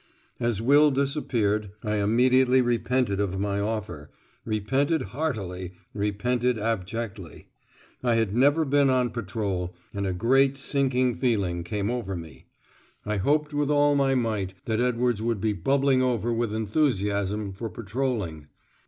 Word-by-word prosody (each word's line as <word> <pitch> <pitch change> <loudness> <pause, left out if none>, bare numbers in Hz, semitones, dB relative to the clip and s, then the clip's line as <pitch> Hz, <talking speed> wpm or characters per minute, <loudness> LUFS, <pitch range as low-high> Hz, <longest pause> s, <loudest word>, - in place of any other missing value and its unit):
As 120 -3 -1
Will 145 +4 +6
disappeared, 120 -8 0
I 105 -1 -1
immediately 125 +5 +4
repented 120 -3 +1
of 95 -2 -1
my 100 0 -1
offer, 100 -8 -4 0.4
repented 135 +8 0
heartily, 95 - -3 0.2
repented 120 +4 0
abjectly. 110 -3 -4 0.5
I 120 -2 +2
had 115 -3 +1
never 145 +6 +4
been 140 0 +3
on 125 -2 +2
patrol, 100 -5 -3 0.2
and 100 -1 -2
a - - 0
great 135 +7 +3
sinking 130 -3 0
feeling 100 -9 0
came 100 +4 -2
over 115 -6 -3
me. 80 -6 -10 0.6
I 105 0 -1
hoped 150 +8 +1
with 145 -1 0
all 145 0 +4
my 135 -1 +2
might 105 -6 -1
that 110 0 0
Edwards 125 -2 +1
would 115 -2 -1
be 105 +2 0
bubbling 135 +7 +2
over 120 -2 0
with 115 -1 -1
enthusiasm 105 -4 0
for 110 +4 -5
patrolling. 105 - -3
115 Hz, 135 wpm, -26 LUFS, 100-130 Hz, 0.6 s, Will